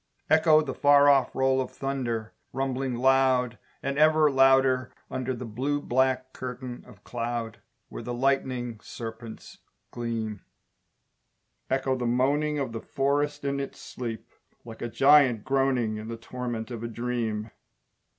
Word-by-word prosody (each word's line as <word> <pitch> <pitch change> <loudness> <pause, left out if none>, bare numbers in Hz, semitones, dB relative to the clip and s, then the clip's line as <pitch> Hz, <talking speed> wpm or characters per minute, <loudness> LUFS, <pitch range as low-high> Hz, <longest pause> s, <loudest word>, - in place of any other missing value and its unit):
Echo 155 -1 +5
the 135 -3 -4
far 145 +1 +5
off 135 -2 +3
roll 130 0 +2
of 130 - -4
thunder, 120 -5 -3 0.2
Rumbling 135 -1 -2
loud 130 -1 +2 0.2
And 140 +1 -2
ever 155 -1 +5
louder, 135 -1 +4 0.2
under 130 0 -2
The 125 +1 -6
blue 130 +6 -2
black 130 -1 0
curtain 125 -1 -7
of 110 -6 -16
cloud, 115 -1 -4 0.3
Where - - -7
the 125 - -5
lightning 125 -2 -1
serpents 115 -1 -9 0.3
gleam, 115 -4 -4 1.3
Echo 135 0 +1
the 125 -2 -2
moaning 145 +5 +1
Of 135 -4 -2
the 115 - -5
forest 145 +1 -1
in 140 0 -1
its 140 - -6
sleep 115 -3 -6 0.4
Like 115 -1 -10
a 120 - -3
giant 135 -4 +5
groaning 130 -5 +1
In 110 +1 -7
the 115 0 -5
torment 120 -1 -5
of 115 -2 -5
a - - -2
dream. 115 -2 -3
130 Hz, 140 wpm, -27 LUFS, 120-135 Hz, 1.3 s, Echo